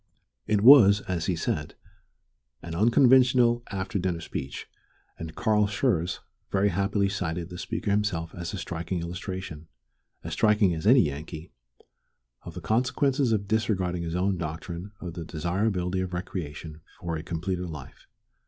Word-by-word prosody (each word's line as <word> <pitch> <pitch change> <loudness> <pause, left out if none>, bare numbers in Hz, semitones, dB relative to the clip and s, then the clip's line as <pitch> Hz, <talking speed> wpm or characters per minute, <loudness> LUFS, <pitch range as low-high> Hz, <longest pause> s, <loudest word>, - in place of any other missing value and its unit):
It 105 -2 +2
was, 105 -5 +8
as 90 -4 -3
he 90 - +1
said, 75 -2 -3 0.9
an 85 - -6
unconventional 120 +3 +5
after 95 +2 -3
dinner 90 -2 -1
speech, 70 -4 -6 0.5
and 80 -1 -7
Carl 105 -1 +2
Schurz 100 -6 0 0.3
very 100 +1 +2
happily 100 +2 +1
cited 90 -4 -3
the 90 -1 -8
speaker 115 -2 -3
himself 100 -5 -1
as 85 -1 -5
a 100 - -5
striking 85 0 -4
illustration 90 -2 -6 0.6
as - - -5
striking 105 -4 +3
as 80 +4 -3
any 125 +2 +7
Yankee 75 +2 -5 0.9
of - - -10
the - - -6
consequences 130 +2 +1
of 100 -2 0
disregarding 95 -5 0
his 85 0 -3
own 95 0 0
doctrine 85 +4 -5
of 90 -3 -6
the 85 -1 -6
desirability 90 +3 -1
of 95 -1 -3
recreation 80 -3 -6 0.2
for 85 -4 -3
a 80 - -4
completer 90 +2 -3
life. 75 -6 -10
95 Hz, 145 wpm, -27 LUFS, 85-105 Hz, 0.9 s, was